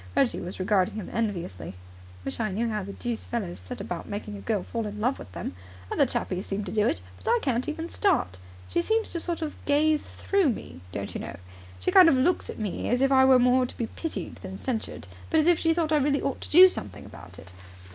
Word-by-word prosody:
Reggie 265 Hz, -, +2 dB
was 180 Hz, +2 st, -6 dB
regarding 185 Hz, 0 st, +2 dB
him 215 Hz, -4 st, -6 dB
enviously. 185 Hz, -, -3 dB
"I -, -, -7 dB, 0.5 s
wish 135 Hz, -, -3 dB
I 220 Hz, -2 st, 0 dB
knew 220 Hz, +5 st, -1 dB
how 215 Hz, -1 st, -1 dB
the 200 Hz, +1 st, -7 dB
deuce 235 Hz, +1 st, -4 dB
fellows 205 Hz, -, -4 dB
set 90 Hz, 0 st, -8 dB
about 175 Hz, -, -5 dB
making 205 Hz, +1 st, -5 dB
a 200 Hz, -, -8 dB
girl 210 Hz, -5 st, -1 dB
fall 230 Hz, -2 st, -3 dB
in 210 Hz, 0 st, -6 dB
love 250 Hz, +5 st, 0 dB
with 95 Hz, -, -10 dB
them. -, -, -5 dB, 0.4 s
Other 280 Hz, -, +3 dB
chappies 195 Hz, -6 st, -2 dB
seem 200 Hz, +1 st, -2 dB
to 190 Hz, -, -6 dB
do 210 Hz, 0 st, +2 dB
it, 90 Hz, -, -1 dB, 0.2 s
but 90 Hz, -, -4 dB
I -, -, +5 dB
can't 255 Hz, -1 st, 0 dB
even 320 Hz, +2 st, -4 dB
start. 330 Hz, -, +1 dB, 0.3 s
She 345 Hz, -, +1 dB
seems 445 Hz, +4 st, 0 dB
to 340 Hz, -, -2 dB
sort 335 Hz, -1 st, -3 dB
of 300 Hz, -, -6 dB
gaze 300 Hz, +1 st, +2 dB
through 395 Hz, -6 st, +1 dB
me, 85 Hz, -, -5 dB
don't 100 Hz, +1 st, -5 dB
you -, -, -4 dB
know. 85 Hz, -, -7 dB, 0.4 s
She -, -, 0 dB
kind 365 Hz, -3 st, +8 dB
of 275 Hz, -, +4 dB
looks 280 Hz, +8 st, +1 dB
at -, -, -6 dB
me 210 Hz, -4 st, -3 dB
as 245 Hz, +2 st, +2 dB
if 270 Hz, -, +3 dB
I 265 Hz, -1 st, +6 dB
were 265 Hz, -1 st, +7 dB
more 250 Hz, +1 st, +4 dB
to -, -, -11 dB
be 235 Hz, -, -1 dB
pitied 325 Hz, +7 st, -5 dB
than 190 Hz, 0 st, -8 dB
censured, 235 Hz, -1 st, -4 dB, 0.2 s
but 320 Hz, -, +3 dB
as 310 Hz, -, +3 dB
if 345 Hz, -1 st, +4 dB
she 325 Hz, -, +3 dB
thought 325 Hz, -1 st, 0 dB
I 305 Hz, -, +5 dB
really 285 Hz, 0 st, +2 dB
ought 275 Hz, -, -2 dB
to -, -, -6 dB
do 365 Hz, +4 st, +10 dB
something 370 Hz, -, -5 dB
about -, -, -12 dB
it. 90 Hz, -1 st, -12 dB
240 Hz, 245 wpm, -27 LUFS, 195-305 Hz, 0.5 s, do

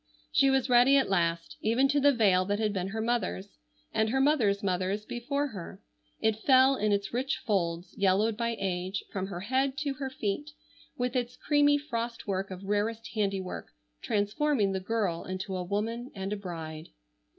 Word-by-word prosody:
She 275 Hz, -, +4 dB
was 265 Hz, -1 st, +2 dB
ready 250 Hz, +2 st, +6 dB
at 265 Hz, -7 st, +1 dB
last, 170 Hz, -2 st, 0 dB
even 235 Hz, +5 st, +3 dB
to 290 Hz, +1 st, +3 dB
the 285 Hz, +1 st, +5 dB
veil 200 Hz, -7 st, +4 dB
that 205 Hz, +1 st, 0 dB
had 215 Hz, -1 st, 0 dB
been 185 Hz, -2 st, -2 dB
her 220 Hz, +3 st, -3 dB
mother's, 220 Hz, -, -2 dB, 0.3 s
and 220 Hz, 0 st, +2 dB
her 265 Hz, +4 st, +1 dB
mother's 245 Hz, -9 st, +3 dB
mother's 190 Hz, +2 st, -1 dB
before 280 Hz, +6 st, -2 dB
her. 190 Hz, -3 st, -8 dB, 0.4 s
It 220 Hz, -1 st, +1 dB
fell 265 Hz, +1 st, +6 dB
in 215 Hz, -4 st, 0 dB
its 200 Hz, 0 st, -1 dB
rich 265 Hz, +3 st, 0 dB
folds, 175 Hz, -6 st, -2 dB
yellowed 200 Hz, +3 st, +2 dB
by 230 Hz, 0 st, -2 dB
age, 185 Hz, 0 st, -2 dB
from 190 Hz, -1 st, -3 dB
her 180 Hz, -3 st, -6 dB
head 265 Hz, +5 st, 0 dB
to 290 Hz, -2 st, -1 dB
her 270 Hz, 0 st, -4 dB
feet, 260 Hz, +4 st, -3 dB, 0.4 s
with 250 Hz, +1 st, -1 dB
its 245 Hz, 0 st, -2 dB
creamy 290 Hz, -1 st, +3 dB
frost 235 Hz, -5 st, -4 dB
work 195 Hz, -1 st, -2 dB
of 185 Hz, 0 st, -8 dB
rarest 215 Hz, +3 st, -1 dB
handiwork, 195 Hz, -4 st, -2 dB, 0.3 s
transforming 210 Hz, +2 st, +1 dB
the 190 Hz, -, -1 dB
girl 190 Hz, -4 st, -1 dB
into 185 Hz, +1 st, -4 dB
a 185 Hz, -, -2 dB
woman 225 Hz, +6 st, -2 dB
and 195 Hz, +1 st, -3 dB
a -, -, -1 dB
bride. 165 Hz, -5 st, -7 dB
215 Hz, 180 wpm, -29 LUFS, 190-255 Hz, 0.4 s, ready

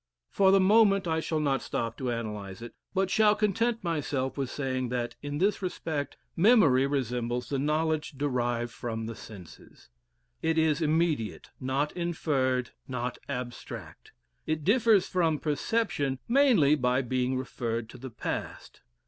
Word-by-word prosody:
For 195 Hz, -1 st, +4 dB
the 195 Hz, -, +6 dB
moment, 195 Hz, -1 st, +4 dB
I 160 Hz, -1 st, +1 dB
shall 160 Hz, -1 st, -1 dB
not 140 Hz, -3 st, +1 dB
stop 115 Hz, 0 st, -3 dB
to 130 Hz, -2 st, -2 dB
analyse 105 Hz, -4 st, -5 dB
it, 120 Hz, -, -9 dB, 0.2 s
but 190 Hz, -1 st, 0 dB
shall 215 Hz, -1 st, +5 dB
content 225 Hz, +2 st, 0 dB
myself 145 Hz, -6 st, -1 dB
with 135 Hz, -3 st, -2 dB
saying 130 Hz, -3 st, -2 dB
that, 120 Hz, -1 st, -2 dB
in 145 Hz, 0 st, -4 dB
this 200 Hz, +6 st, +1 dB
respect, 160 Hz, -5 st, -3 dB, 0.2 s
memory 165 Hz, -, +5 dB
resembles 125 Hz, -3 st, -2 dB
the 140 Hz, -, -1 dB
knowledge 155 Hz, +2 st, 0 dB
derived 120 Hz, -4 st, -1 dB
from 115 Hz, -2 st, -4 dB
the 115 Hz, -, -5 dB
senses. 100 Hz, -5 st, -13 dB, 0.5 s
It 160 Hz, 0 st, +1 dB
is 160 Hz, -1 st, +2 dB
immediate, 155 Hz, -7 st, 0 dB
not 135 Hz, +3 st, -1 dB
inferred, 140 Hz, -8 st, -1 dB, 0.2 s
not 125 Hz, -1 st, -3 dB
abstract; 125 Hz, -1 st, -7 dB, 0.4 s
it 155 Hz, -1 st, -1 dB
differs 215 Hz, -, +4 dB
from 165 Hz, -4 st, +1 dB
perception 145 Hz, -2 st, -1 dB
mainly 235 Hz, -, +5 dB
by 125 Hz, -2 st, +2 dB
being 130 Hz, +1 st, 0 dB
referred 115 Hz, -3 st, -3 dB
to 130 Hz, -, -12 dB
the 130 Hz, +1 st, -7 dB
past. 115 Hz, -, -6 dB
145 Hz, 145 wpm, -28 LUFS, 125-170 Hz, 0.5 s, the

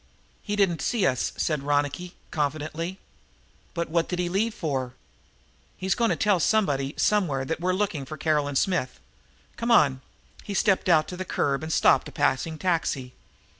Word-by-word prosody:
"He 205 Hz, -, -3 dB
didn't 195 Hz, -5 st, +2 dB
see 225 Hz, -6 st, +1 dB
us," 130 Hz, -7 st, +1 dB
said 155 Hz, -3 st, 0 dB
Ronicky 145 Hz, +5 st, -1 dB, 0.2 s
confidently. 155 Hz, +4 st, -2 dB, 0.8 s
"But 170 Hz, -1 st, -1 dB
what 165 Hz, +1 st, 0 dB
did 180 Hz, -, -2 dB
he 175 Hz, -1 st, -1 dB
leave 210 Hz, +5 st, 0 dB
for?" 135 Hz, -6 st, -2 dB, 0.8 s
"He's 190 Hz, 0 st, 0 dB
gone 235 Hz, -2 st, +1 dB
to -, -, +2 dB
tell 205 Hz, -4 st, +2 dB
somebody, 145 Hz, -9 st, +1 dB
somewhere, 160 Hz, -11 st, +1 dB
that 160 Hz, +4 st, -3 dB
we're 180 Hz, +2 st, +1 dB
looking 185 Hz, -8 st, -1 dB
for 155 Hz, +3 st, -7 dB
Caroline 150 Hz, -2 st, 0 dB
Smith. 175 Hz, -4 st, 0 dB, 0.6 s
Come 235 Hz, +1 st, -2 dB
on!" 140 Hz, -, +4 dB, 0.4 s
He 200 Hz, -, -5 dB
stepped 195 Hz, -1 st, +2 dB
out 155 Hz, -3 st, +4 dB
to 180 Hz, -, -6 dB
the 185 Hz, -, -3 dB
curb 140 Hz, -6 st, 0 dB
and 160 Hz, +1 st, -5 dB
stopped -, -, +4 dB
a -, -, -9 dB
passing 145 Hz, +3 st, 0 dB
taxi. 155 Hz, -8 st, -1 dB
165 Hz, 170 wpm, -26 LUFS, 145-190 Hz, 0.8 s, on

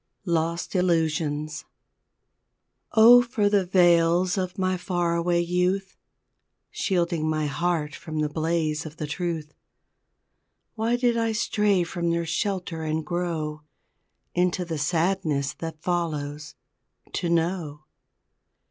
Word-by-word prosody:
LOST 170 Hz, -1 st, -1 dB
ILLUSIONS 160 Hz, -3 st, 0 dB, 1.3 s
Oh, 235 Hz, +2 st, +8 dB
for 235 Hz, -4 st, 0 dB
the 200 Hz, -3 st, +2 dB
veils 175 Hz, 0 st, +4 dB
of 185 Hz, -2 st, -3 dB
my 185 Hz, -1 st, +1 dB
far 175 Hz, -2 st, -1 dB
away 170 Hz, 0 st, +1 dB
youth, 180 Hz, +3 st, 0 dB, 0.8 s
Shielding 170 Hz, -4 st, 0 dB
my 155 Hz, -1 st, 0 dB
heart 155 Hz, 0 st, -1 dB
from 155 Hz, +1 st, -7 dB
the 150 Hz, 0 st, +1 dB
blaze 155 Hz, 0 st, -1 dB
of 155 Hz, 0 st, -9 dB
the 155 Hz, -, -3 dB
truth, 155 Hz, 0 st, -4 dB, 1.2 s
Why 230 Hz, +1 st, 0 dB
did 240 Hz, -1 st, +1 dB
I 230 Hz, -1 st, +1 dB
stray 210 Hz, -3 st, +2 dB
from 170 Hz, 0 st, -2 dB
their 170 Hz, 0 st, 0 dB
shelter 180 Hz, -2 st, -2 dB
and 155 Hz, 0 st, -2 dB
grow 160 Hz, -3 st, -3 dB, 0.7 s
Into 180 Hz, 0 st, +1 dB
the 165 Hz, -3 st, -4 dB
sadness 160 Hz, -3 st, 0 dB
that 160 Hz, -1 st, -6 dB
follows 150 Hz, -4 st, -3 dB, 0.6 s
to 175 Hz, -, -1 dB
know! 165 Hz, -3 st, -1 dB
170 Hz, 115 wpm, -25 LUFS, 155-185 Hz, 1.3 s, Oh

